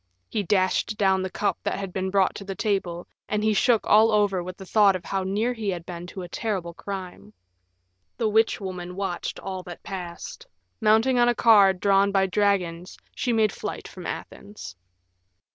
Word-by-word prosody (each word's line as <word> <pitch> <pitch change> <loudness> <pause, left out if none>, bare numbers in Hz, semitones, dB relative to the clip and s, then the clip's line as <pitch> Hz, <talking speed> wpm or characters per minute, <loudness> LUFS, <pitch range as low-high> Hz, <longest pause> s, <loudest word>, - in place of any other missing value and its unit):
He 215 - -1
dashed 190 +2 +1
down 190 -2 +3
the 190 - -3
cup 205 - -1
that - - -2
had 195 -2 -5
been 190 0 -2
brought 195 -1 +2
to 200 - -8
the 195 -1 -6
table, 185 -5 -2 0.2
and 210 0 0
he 215 0 +3
shook 235 +1 +3
all 220 +2 +5
over 205 -3 +2
with 180 +1 -7
the 190 - -10
thought 200 0 +4
of 180 - -6
how 195 - -1
near 205 +6 0
he 220 -4 -3
had 175 -3 -4
been 175 -1 -7
to 185 +1 -7
a - - -7
terrible 185 -3 -3
crime. 180 - -8 0.8
The 225 - +1
witch 220 +1 +2
woman 180 -2 -6
watched 195 -2 -3
all 190 -1 -5
that 175 -1 -10
passed; 180 -3 -7 0.3
mounting 225 +4 +3
on 240 0 +5
a 240 - +1
car 210 -5 +6
drawn 195 +1 +2
by 195 -1 +3
dragons 185 -3 0 0.2
she 250 - -1
made 220 -2 +3
flight - - -6
from - - -9
Athens. 95 -2 -8
195 Hz, 190 wpm, -25 LUFS, 180-210 Hz, 0.8 s, car